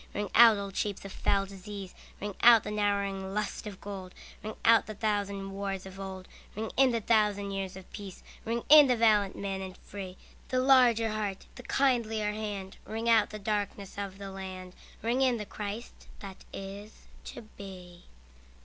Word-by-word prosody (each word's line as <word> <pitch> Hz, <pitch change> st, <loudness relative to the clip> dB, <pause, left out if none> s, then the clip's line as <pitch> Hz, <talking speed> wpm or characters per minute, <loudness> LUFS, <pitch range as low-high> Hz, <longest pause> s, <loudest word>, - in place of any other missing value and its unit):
Ring 205 Hz, 0 st, -2 dB
out 230 Hz, -2 st, +8 dB
old 200 Hz, -1 st, -5 dB
shapes 200 Hz, -2 st, -2 dB
of 195 Hz, -, -7 dB
foul 195 Hz, 0 st, +1 dB
disease, 195 Hz, 0 st, -8 dB, 0.3 s
Ring 205 Hz, 0 st, -4 dB
out 230 Hz, -2 st, +8 dB
the -, -, -5 dB
narrowing 200 Hz, -2 st, -1 dB
lust 210 Hz, 0 st, -3 dB
of 200 Hz, -2 st, -8 dB
gold; 190 Hz, -2 st, -8 dB, 0.3 s
Ring 215 Hz, +1 st, -5 dB
out 230 Hz, -1 st, +6 dB
the 215 Hz, -, -6 dB
thousand 200 Hz, -2 st, -2 dB
wars 195 Hz, -1 st, -4 dB
of 190 Hz, 0 st, -10 dB
old, 190 Hz, -1 st, -7 dB, 0.3 s
Ring 220 Hz, +2 st, -4 dB
in 270 Hz, 0 st, +5 dB
the 230 Hz, -2 st, 0 dB
thousand 210 Hz, -2 st, +2 dB
years 195 Hz, -1 st, -4 dB
of 190 Hz, -, -11 dB
peace. 200 Hz, -3 st, -9 dB, 0.2 s
Ring 230 Hz, +1 st, -2 dB
in 300 Hz, -1 st, +9 dB
the 250 Hz, -, +3 dB
valiant 210 Hz, -4 st, +3 dB
man 195 Hz, -1 st, -3 dB
and 190 Hz, -1 st, -7 dB
free, 190 Hz, -2 st, -8 dB, 0.3 s
The 255 Hz, -, 0 dB
larger 250 Hz, -4 st, +5 dB
heart, 210 Hz, -3 st, -3 dB
the -, -, -10 dB
kindlier 225 Hz, -6 st, +1 dB
hand; 205 Hz, -3 st, -5 dB
Ring 225 Hz, +2 st, -4 dB
out 225 Hz, -2 st, +5 dB
the 215 Hz, -, -6 dB
darkenss 205 Hz, -1 st, -3 dB
of 195 Hz, -1 st, -5 dB
the 195 Hz, -1 st, -7 dB
land, 185 Hz, -1 st, -7 dB, 0.3 s
Ring 240 Hz, +3 st, +1 dB
in 255 Hz, -3 st, +3 dB
the 210 Hz, -, -5 dB
Christ 210 Hz, +3 st, -6 dB, 0.2 s
that 195 Hz, -2 st, -10 dB
is 200 Hz, +2 st, -9 dB, 0.2 s
to 240 Hz, -, -8 dB
be. 185 Hz, -4 st, -11 dB
205 Hz, 180 wpm, -30 LUFS, 195-220 Hz, 0.3 s, in